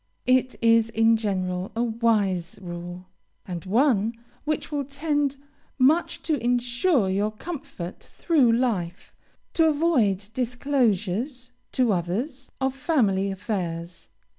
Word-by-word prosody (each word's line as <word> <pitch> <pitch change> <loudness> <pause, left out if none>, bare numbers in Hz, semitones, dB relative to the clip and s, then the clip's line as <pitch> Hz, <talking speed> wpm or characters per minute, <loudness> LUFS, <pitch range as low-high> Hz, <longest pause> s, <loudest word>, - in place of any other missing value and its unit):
It 255 0 +3
is, 230 -1 +5
in 225 0 +4
general, 185 -4 -2
a 235 - +1
wise 215 -7 0
rule, 175 0 -7 0.4
and 175 -3 -5
one 225 +1 +2 0.3
which 305 0 -2
will 290 -1 -1
tend 285 0 -1 0.4
much 290 +6 +2
to 295 -7 -1
insure 245 - +2
your 200 +3 +1
comfort 215 - -7
through 290 -9 +2
life, 210 -8 -1 0.4
to 325 - +4
avoid 260 - +2
disclosures 245 -1 -1 0.2
to 245 -5 +3
others 235 - -3
of 265 0 0
family 215 - +1
affairs. 180 -4 -4
230 Hz, 115 wpm, -25 LUFS, 190-270 Hz, 0.4 s, is